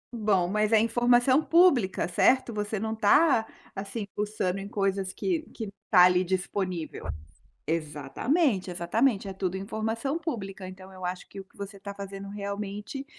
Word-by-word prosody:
Bom, 205 -6 +2
mas 210 +3 +1
é 220 - +6
informação 240 +4 +4
pública 305 - +4
certo? 240 +6 +3
Você 210 0 -2
não 220 +1 -2
está, 225 +3 +4 0.3
assim, 200 +2 -4
fuçando 205 -2 -1
em 195 - -6
coisas 195 -2 -1
que 345 - -1
que 225 - -6 0.2
está 180 -4 +6
ali 180 0 +4
disponível. 185 -2 -3 0.6
Exatamente 180 - 0
exatamente 195 +5 +1
é - - -4
tudo 190 -1 -2
informação 225 +8 -2
pública 195 - -5
então 185 0 -11
eu 185 -1 -8
acho 180 0 -5
que - - -9
o 195 - -9
que - - -30
você 200 0 -7
está 200 +1 -7
fazendo 200 0 -7
realmente 205 +5 -5
200 Hz, 155 wpm, -28 LUFS, 190-230 Hz, 0.6 s, é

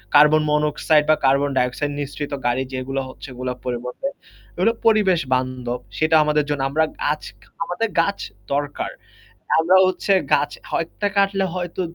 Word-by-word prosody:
Carbon monoxide 150 0 +4
বা 155 - +6
carbon dioxide 135 0 +1
নিশ্রিত 145 +1 -5
গাড়ি 125 +2 +1
যেগুলো 135 +1 -2
হচ্ছে 130 - -11
ওগুলার 125 0 -4
পরিবর্তে 125 - -4 0.5
এগুলো 230 - +3 0.2
পরিবেশ 200 -6 +4
বান্ধব। 125 -1 -2 0.2
সেটা 155 +1 +3
আমাদের 150 0 +2
জন্য 145 -2 -1
আমরা 155 +3 +2 0.2
গাছ 150 +1 0 0.2
খা - - -22 0.2
আমাদের 200 +5 -2
গাছ 200 +4 -1 0.3
দরকার। 145 0 -2 0.7
আমরা 165 +3 +4
হচ্ছে 185 +2 -1 0.2
গাছটা 145 - 0
হয় - - +1
১ - - -25
টা 205 - +3
কাটলে 195 -1 +2
হয়তো 180 0 -3
150 Hz, 145 wpm, -21 LUFS, 130-170 Hz, 0.7 s, বা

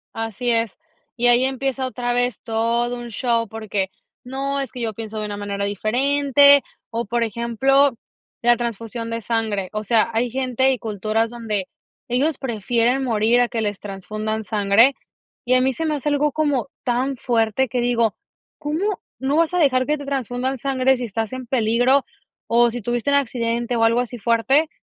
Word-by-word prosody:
Así 225 +2 -2
es, 230 -3 0 0.4
y 240 - 0
ahí 245 +1 +5
empieza 265 0 -1
otra 245 -1 -2
vez 245 -2 0
todo 235 +2 0
un 240 0 -7
show, 230 0 0
porque 210 -3 -3 0.3
no, 275 +2 -3
es 265 - -5
que 250 - -8
yo 225 -2 -2
pienso 220 0 -7
de 215 - -3
una 205 -1 -5
manera 200 0 -3
diferente, 280 +7 +4 0.3
o, 230 +1 -2
por 235 +1 0
ejemplo, 235 +4 +2 0.5
la 240 0 +5
transfusión 230 0 -4
de 230 0 -3
sangre, 215 -4 -1
o 215 0 -3
sea, 225 +2 +2
hay 235 +2 +1
gente 260 +1 +1
y 260 - 0
culturas 220 +1 -1
donde 215 -5 -3 0.4
ellos 275 +5 +1
prefieren 240 +1 0
morir 230 0 +3
a 245 - +3
que 225 -2 -2
les 205 -2 -2
transfundan 215 +2 -4
sangre 205 +6 +4 0.5
y 255 - +3
a 255 - +4
mí 260 0 +2
se 325 - -3
me 305 - 0
hace 295 +1 -2
algo 290 0 +2
como 290 -4 0 0.2
tan 255 +2 0
fuerte 235 +1 +1
que 245 +1 -1
digo: 235 -3 +1 0.4
"¿Cómo 335 +7 -1 0.2
no 270 +5 0
vas 330 +1 +2
a - - +2
dejar 255 -5 +3
que 300 0 +1
te 285 - -8
transfundan 260 -1 -2
sangre 265 -1 +2
si 245 - -4
estás 225 +2 -3
en 255 -2 -6
peligro 245 +2 +2 0.4
o 235 +1 +4
si 240 0 -5
tuviste 240 +4 -1
un 280 - +3
accidente 240 -2 0
o 225 - +2
algo 230 +2 +4
así 245 -1 -3
fuerte? 260 +8 +2
240 Hz, 185 wpm, -21 LUFS, 225-265 Hz, 0.5 s, ahí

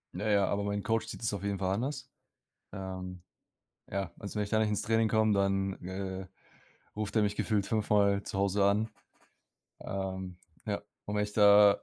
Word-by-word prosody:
Na 105 +4 -2
ja, 100 -1 +4
aber 100 0 0
mein 100 0 -2
Coach 115 0 0
sieht - - -7
es 110 - 0
auf 100 - -4
jeden 100 -1 -1
Fall 95 0 0
anders. 130 +8 -3 0.6
Ähm, 95 -1 -6 0.7
ja, 95 -3 -2
also, 100 +1 -7
wenn 105 - +1
ich 100 - -8
da 110 - +3
nicht 110 -1 +2
ins 105 - 0
Training 115 0 +2
komm, 110 0 +3
dann, 95 0 +1
äh, 95 0 -5 0.7
ruft 105 -1 -3
er 110 - +5
mich 105 0 0
gefühlt 105 -3 +1
5-mal 100 -2 +2
zu 95 - -4
Hause 100 0 +2
an. 105 +3 +3 0.9
Ähm, 95 -2 -4 0.3
ja, 100 -1 -2 0.2
und 105 - -4
wenn 105 - +2
ich 105 0 -3
da 105 -1 +7
100 Hz, 190 wpm, -31 LUFS, 95-105 Hz, 0.9 s, da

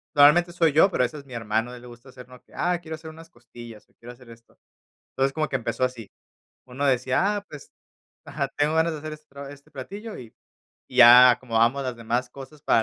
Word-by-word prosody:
normalmente 160 +5 +5
soy 170 -2 +1
yo, 160 +6 +5
pero, 125 - 0
a - - +3
veces, 145 +3 -8
mi 130 - -12
hermano, 115 +1 -2
a - - -9
él 120 - -13
le - - -12
gusta 120 +2 -15
hacernos 125 -1 -14
que: - - -27
"Ah, 175 0 -1
quiero 160 -2 -7
hacer 160 0 -11
unas 165 +1 -15
costillas, 120 -9 -14
o - - -35
quiero 120 +1 -13
hacer 125 -1 -17
esto". 115 0 -19 0.6
Entonces, 135 0 0
como 155 0 -2
que - - -4
empezó 130 0 -3
así. 125 -5 -4 0.6
Uno 130 +3 -5
decía: 130 +10 +1
"Ah, 205 - -6
pues, 150 -2 -12 0.5
ajá, - - -3
tengo 150 +2 +1
ganas 165 +1 +2
de 155 - -6
hacer 155 +1 -7
este 155 0 -12
pra 140 0 -11
este 140 0 -16
platillo 205 - -8
y 115 -3 -12 0.6
y 125 - -11
ya 125 +1 +9
acomodamos 120 +2 0
los 125 -2 -4
demás 120 +2 -3
cosas 140 +3 -13
para, 115 - +2
135 Hz, 230 wpm, -24 LUFS, 120-155 Hz, 0.6 s, ya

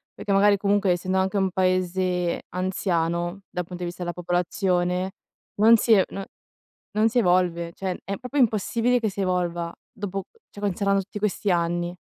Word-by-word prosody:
perché 200 - -4
magari 200 +1 +5
comunque 200 0 +2
essendo 185 +2 0
anche 190 +2 0
un 190 -1 +1
paese 185 -1 0
anziano, 175 -1 -1
dal 180 - -2
punto 180 +1 -7
di - - -1
vista 175 +1 -6
della 175 0 -2
popolazione, 180 +1 0 0.5
non 225 +1 +8
si 225 +1 +4
e 190 -3 +6 0.9
non 215 +2 +3
si 245 +2 0
evolve, 175 -4 +2
cioè 190 -2 -3
è 200 0 -3
proprio 255 +3 -5
impossibile 235 +1 +2
che 220 -2 0
si 200 - -6
evolva, 175 -2 -1 0.2
dopo 195 -1 -5 0.2
cioè 205 - -11
considerando 200 0 +1
tutti 200 +2 -7
questi 205 -1 -1
anni. 175 0 0
185 Hz, 165 wpm, -25 LUFS, 175-200 Hz, 0.9 s, non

